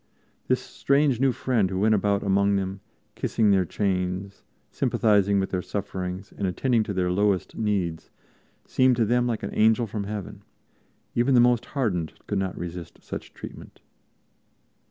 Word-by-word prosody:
This - - +2
strange 140 -3 +1
new 135 0 +3
friend 120 -6 0
who 95 - -3
went 110 +3 +3
about 100 -1 +1
among 100 0 +2
them, 95 0 -2 0.3
kissing 110 -1 +1
their 95 -2 +3
chains, 95 +1 -2 0.3
sympathizing 100 -2 +2
with 95 - -2
their 90 - -1
sufferings 95 -1 -5
and 100 - -1
attending 115 +6 +1
to 100 - -3
their 90 -1 +1
lowest 100 0 +1
needs 95 -7 -1 0.6
seemed 130 -1 +3
to 115 -1 +2
them 120 +2 +2
like 115 -3 -2
an - - -4
Angel 110 +2 +3
from 105 -1 -4
Heaven; 105 -1 -6 0.7
even 125 +3 +3
the - - +7
most 120 0 +4
hardened 90 - 0
could 100 - -1
not 95 -2 -3
resist 85 -1 -7
such - - -8
treatment. - - -10
100 Hz, 155 wpm, -25 LUFS, 95-115 Hz, 0.7 s, the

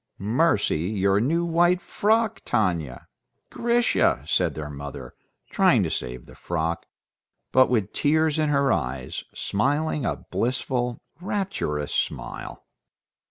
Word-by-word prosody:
"Mercy! 110 - +2
Your 100 -1 +2
new 165 +9 +1
white 175 +2 +3
frock! 220 +3 +1
Tanya! 85 - -1 0.5
Grisha!" 240 0 +2
said - - +1
their 75 -1 -5
mother, 70 -3 -8 0.4
trying - - +4
to - - -2
save 60 -1 -4
the - - -15
frock, 85 0 -3 0.6
but 130 0 +5
with 110 -5 0
tears 155 +1 +2
in 155 -1 +2
her 140 -2 +3
eyes, 65 +1 -3
smiling 145 +7 0
a - - 0 0.2
blissful, 125 0 -1 0.2
rapturous 180 - -2
smile. - - -4
125 Hz, 115 wpm, -25 LUFS, -, 0.6 s, but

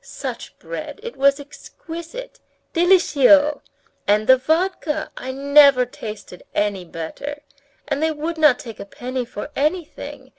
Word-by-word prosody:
Such - - -7
bread, - - -7
it 475 - -6
was 275 +1 +3
exquisite! 330 - -9 0.3
Délicieux! 300 -5 +4 0.5
And 210 +1 +3
the 260 - +7
vodka, 315 +2 -1
I 260 - -5
never 280 -1 +5
tasted 210 -6 -9
any 205 -3 0
better. 280 - -7 0.4
And 285 0 -1
they 320 - +2
would 315 +2 -4
not 300 -5 +6
take 225 -3 -10
a - - -6
penny 250 +4 -5
for 235 +4 -7
anything. 310 +3 -3
285 Hz, 135 wpm, -21 LUFS, 250-320 Hz, 0.5 s, the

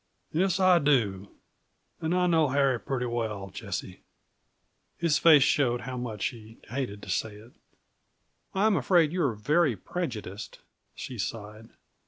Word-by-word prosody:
"Yes, 185 +3 +1
I 185 -2 +5
do; 105 - +1 0.7
and 160 +2 0
I 180 0 +2
know 165 -3 +3
Harry 135 -2 +2
pretty 125 -1 -3
well, 110 -5 -3
Jessie." 95 -2 -6 1.0
His 165 -3 +2
face 155 -5 +7
showed 125 -4 +2
how 130 +1 -6
much 120 -5 -4
he 115 -2 -13
hated 120 -5 -4
to - - -9
say 110 -2 -2
it. 110 +4 -15 1.0
"I'm 205 +2 +3
afraid 160 +1 +3
you 180 +1 -1
are 130 -8 +1
very 145 +5 +2
prejudiced," 110 - -6 0.4
she 125 -3 -7
sighed. 110 +1 -6
125 Hz, 140 wpm, -28 LUFS, 110-160 Hz, 1.0 s, face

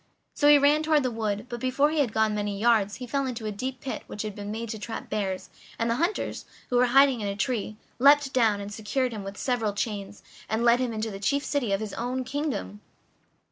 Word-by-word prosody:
So 290 - +2
he 295 0 +9
ran 290 +2 +4
toward 310 -2 +3
the 255 - 0
wood, 215 -1 -2
but 240 -1 -6
before 265 +4 +2
he 315 - 0
had 265 -6 +2
gone 220 -1 +2
many 205 -1 -2
yards 215 -3 +3
he 250 - -7
fell 275 +2 -1
into 235 -3 -5
a 215 - -2
deep 255 +6 -5
pit 265 - -4
which 210 - -5
had 215 -1 -4
been 205 -1 -6
made 225 +2 -4
to 220 - -5
trap 225 +2 -6
bears, 195 -3 -2 0.3
and 230 0 0
the 230 - 0
hunters, 345 +7 -1 0.3
who 245 - +3
were 250 0 +5
hiding 270 -1 +5
in 205 - -2
a 200 - -2
tree, 215 0 -2 0.2
leaped 280 +1 +5
down, 225 -5 +3
and 200 +1 -7
secured 245 +5 -1
him 210 -2 -5
with 195 +1 -7
several 230 -5 0
chains, 205 -1 -4 0.3
and 220 +2 0
led 235 +1 +5
him 250 -2 -1
into 220 0 -3
the 195 - -7
chief 280 +8 0
city 270 -8 -1
of 195 +1 +1
his 215 -2 -5
own 250 +2 -2
kingdom. 255 - -3
230 Hz, 240 wpm, -27 LUFS, 210-260 Hz, 0.3 s, he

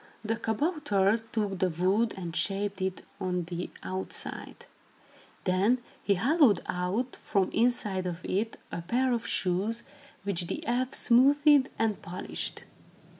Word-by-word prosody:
The 225 +1 +1
kabouter 225 - +1
took 205 -4 -1
the 185 - +2
wood 190 +7 +1
and 175 -3 -5
shaped 200 0 -1
it 190 0 -2
on 180 -2 -1
the 175 +1 -4
outside. 185 0 -4 0.8
Then 195 +6 +3 0.2
he 200 - +2
hollowed 250 - +4
out, 190 +8 -1
from 195 -3 0
inside 210 -6 +1
of 175 0 -5
it, 215 +4 -1
a 170 - -3
pair 245 +9 +1
of 235 -1 -2
shoes, 195 +6 0 0.4
which 180 -3 -1
the - - -4
elf 250 +2 0
smoothed 280 +3 +5
and 220 -2 0
polished. 180 +2 -4
205 Hz, 130 wpm, -29 LUFS, 185-235 Hz, 0.8 s, smoothed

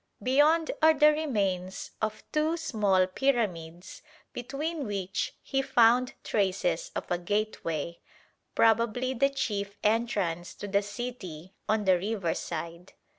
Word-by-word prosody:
Beyond 300 +5 +4
are 315 0 +6
the 300 +1 +6
remains 200 - -2
of 215 0 -2
two 310 +2 +1
small 210 - +2
pyramids 185 -7 -2 0.3
between 280 +4 -4
which 195 -2 -3
he 270 - 0
found 250 -1 +4
traces 185 -4 0
of - - -3
a 175 - +1
gateway, 170 -4 -2 0.6
probably 230 +3 +3
the 275 +2 +3
chief 205 -7 -3
entrance 205 -6 0
to 205 - -7
the 200 0 +2
city 200 -6 -7 0.2
on 215 -1 +1
the 185 -2 +4
riverside. 175 -3 -4
215 Hz, 120 wpm, -28 LUFS, 185-260 Hz, 0.6 s, are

